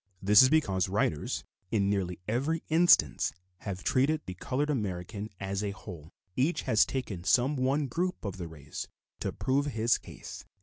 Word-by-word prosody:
This 100 Hz, +2 st, +7 dB
is 130 Hz, -, +6 dB
because 100 Hz, -, +2 dB
writers, 95 Hz, -6 st, -1 dB, 0.3 s
in 100 Hz, -2 st, +1 dB
nearly 95 Hz, -3 st, -1 dB
every 140 Hz, +9 st, 0 dB
instance, 170 Hz, +2 st, +4 dB, 0.3 s
have 95 Hz, -3 st, -5 dB
treated 145 Hz, +4 st, +2 dB
the 95 Hz, -, -5 dB
colored 140 Hz, +11 st, -1 dB
American 100 Hz, -3 st, -3 dB
as 95 Hz, +1 st, -2 dB
a 105 Hz, -, -1 dB
whole; 90 Hz, -6 st, -9 dB, 0.3 s
each 145 Hz, +7 st, +1 dB
has 110 Hz, -, +4 dB
taken 110 Hz, -10 st, -4 dB
some 125 Hz, +10 st, +3 dB
one 135 Hz, +3 st, +1 dB
group 175 Hz, +4 st, -2 dB
of 100 Hz, -2 st, -4 dB
the 85 Hz, -2 st, -5 dB
race 75 Hz, -2 st, -7 dB, 0.3 s
to -, -, -2 dB
prove 140 Hz, +2 st, 0 dB
his 115 Hz, -3 st, +2 dB
case. -, -, -10 dB
105 Hz, 165 wpm, -30 LUFS, 95-135 Hz, 0.3 s, This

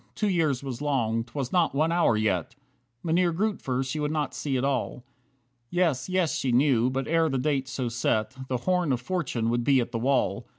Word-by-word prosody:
Two 210 Hz, -, 0 dB
years 155 Hz, -8 st, +1 dB
was 135 Hz, -1 st, -5 dB
long; 115 Hz, -6 st, 0 dB
'twas 130 Hz, +1 st, -5 dB
not 170 Hz, -6 st, +2 dB
one 155 Hz, +3 st, +2 dB
hour 170 Hz, -10 st, +3 dB
yet! 105 Hz, 0 st, -1 dB, 0.5 s
Mynheer 170 Hz, +1 st, +2 dB
Grootver 165 Hz, -9 st, -1 dB
she 135 Hz, +4 st, -4 dB
would 150 Hz, 0 st, 0 dB
not 150 Hz, -2 st, -2 dB
see 135 Hz, -3 st, -2 dB
at 125 Hz, -, -1 dB
all. 130 Hz, -2 st, -2 dB, 0.7 s
Yes, 175 Hz, -5 st, 0 dB
yes, 185 Hz, -4 st, +1 dB
she 130 Hz, -, -1 dB
knew, 125 Hz, -1 st, +3 dB
but 135 Hz, +1 st, -2 dB
ere 165 Hz, 0 st, +2 dB
the 135 Hz, -, -1 dB
date 135 Hz, 0 st, 0 dB
so 130 Hz, -1 st, -3 dB
set, 115 Hz, 0 st, -1 dB
The 130 Hz, -, -1 dB
"Horn 180 Hz, +3 st, 0 dB
of 125 Hz, -, -1 dB
Fortune" 125 Hz, -7 st, -2 dB
would 120 Hz, 0 st, 0 dB
be 135 Hz, +1 st, +4 dB
at 120 Hz, -, -2 dB
the 115 Hz, -, -2 dB
wall. 135 Hz, +3 st, 0 dB
135 Hz, 205 wpm, -27 LUFS, 125-160 Hz, 0.7 s, be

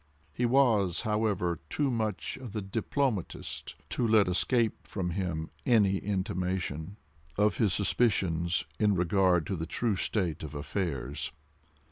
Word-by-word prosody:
He 120 Hz, +6 st, +1 dB
was, 115 Hz, -9 st, +3 dB
however, 105 Hz, -6 st, 0 dB
too 145 Hz, -3 st, 0 dB
much 110 Hz, -3 st, -2 dB
of 125 Hz, -5 st, -8 dB
the 105 Hz, -, -2 dB
diplomatist 110 Hz, -, -2 dB, 0.2 s
to 120 Hz, -, +1 dB
let 110 Hz, -3 st, +5 dB
escape 105 Hz, -, +1 dB
him 90 Hz, -4 st, -2 dB
any 105 Hz, -6 st, +4 dB
intimation 95 Hz, -3 st, -2 dB, 0.4 s
of 105 Hz, +1 st, +3 dB
his 110 Hz, -5 st, +3 dB
suspicions 90 Hz, -6 st, +2 dB
in 105 Hz, -2 st, +3 dB
regard 90 Hz, -1 st, +3 dB
to 95 Hz, -, -2 dB
the 80 Hz, -1 st, -4 dB
true 110 Hz, +4 st, 0 dB
state 90 Hz, -4 st, -1 dB
of 75 Hz, -1 st, -7 dB
affairs. 75 Hz, -4 st, -3 dB
95 Hz, 125 wpm, -30 LUFS, 85-110 Hz, 0.4 s, let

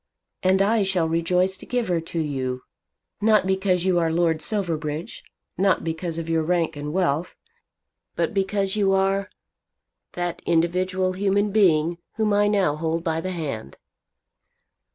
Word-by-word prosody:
And 190 Hz, +1 st, +3 dB
I 220 Hz, +2 st, +2 dB
shall 190 Hz, -4 st, +1 dB
rejoice 180 Hz, +3 st, +1 dB
to -, -, -11 dB
give 245 Hz, -2 st, -1 dB
her 175 Hz, -2 st, 0 dB
to 165 Hz, +1 st, -4 dB
you, 130 Hz, -4 st, -2 dB, 0.6 s
not 215 Hz, -2 st, +4 dB
because 190 Hz, -1 st, +1 dB
you 180 Hz, -2 st, +3 dB
are 165 Hz, -1 st, +1 dB
Lord 165 Hz, -1 st, +1 dB
Silverbridge, 160 Hz, -4 st, -3 dB, 0.4 s
not 195 Hz, 0 st, +2 dB
because 165 Hz, 0 st, -3 dB
of 165 Hz, -1 st, -4 dB
your 165 Hz, -1 st, +1 dB
rank 165 Hz, -1 st, 0 dB
and 145 Hz, 0 st, -5 dB
wealth; 170 Hz, -2 st, 0 dB, 0.8 s
but -, -, -1 dB
because 195 Hz, 0 st, 0 dB
you 200 Hz, -2 st, +2 dB
are 195 Hz, +1 st, +1 dB, 0.8 s
that 175 Hz, -1 st, -3 dB
individual 185 Hz, +2 st, +1 dB
human 200 Hz, +2 st, +1 dB
being 170 Hz, -5 st, +3 dB, 0.2 s
whom 215 Hz, -1 st, +1 dB
I 205 Hz, 0 st, +3 dB
now 195 Hz, -8 st, +2 dB
hold 165 Hz, +1 st, -2 dB
by 165 Hz, -1 st, -1 dB
the 185 Hz, -, -3 dB
hand." 140 Hz, -, -5 dB
180 Hz, 150 wpm, -24 LUFS, 165-195 Hz, 0.8 s, not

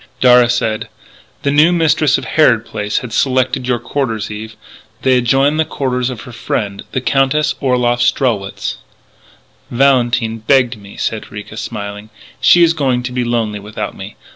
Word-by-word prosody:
Darragh 125 Hz, -1 st, +6 dB
said: 115 Hz, -3 st, -1 dB, 0.6 s
"The 140 Hz, -, +1 dB
new 150 Hz, +4 st, +5 dB
mistress 160 Hz, -4 st, +2 dB
of -, -, -6 dB
Harrod 120 Hz, -8 st, +3 dB
Place 105 Hz, 0 st, -3 dB
has 115 Hz, -, -8 dB
selected 130 Hz, 0 st, +1 dB
your 125 Hz, -1 st, +1 dB
quarters, 115 Hz, -3 st, -3 dB
Eve. 110 Hz, +1 st, -7 dB, 0.5 s
They 130 Hz, -1 st, +4 dB
adjoin 135 Hz, +5 st, +2 dB
the 160 Hz, -, +3 dB
quarters 130 Hz, -4 st, -2 dB
of 125 Hz, -4 st, -7 dB
her 125 Hz, -, -10 dB
friend, 105 Hz, -3 st, -3 dB
the 130 Hz, -, -2 dB
Countess 135 Hz, +3 st, +1 dB
Orloff 125 Hz, -3 st, +1 dB
Strelwitz." 115 Hz, -6 st, 0 dB, 0.9 s
"Valentine 120 Hz, -3 st, +2 dB
begged 125 Hz, +1 st, +2 dB
me," 100 Hz, -1 st, -14 dB
said 110 Hz, -1 st, -3 dB
Ricca, 105 Hz, +1 st, -9 dB
smiling. 105 Hz, -1 st, -6 dB, 0.3 s
"She 175 Hz, -, +6 dB
is 165 Hz, -1 st, +4 dB
going 130 Hz, -6 st, 0 dB
to 125 Hz, -, -4 dB
be 125 Hz, 0 st, -1 dB
lonely 115 Hz, -3 st, -1 dB
without 105 Hz, +2 st, -6 dB
me. -, -, -9 dB
125 Hz, 160 wpm, -16 LUFS, 110-135 Hz, 0.9 s, Darragh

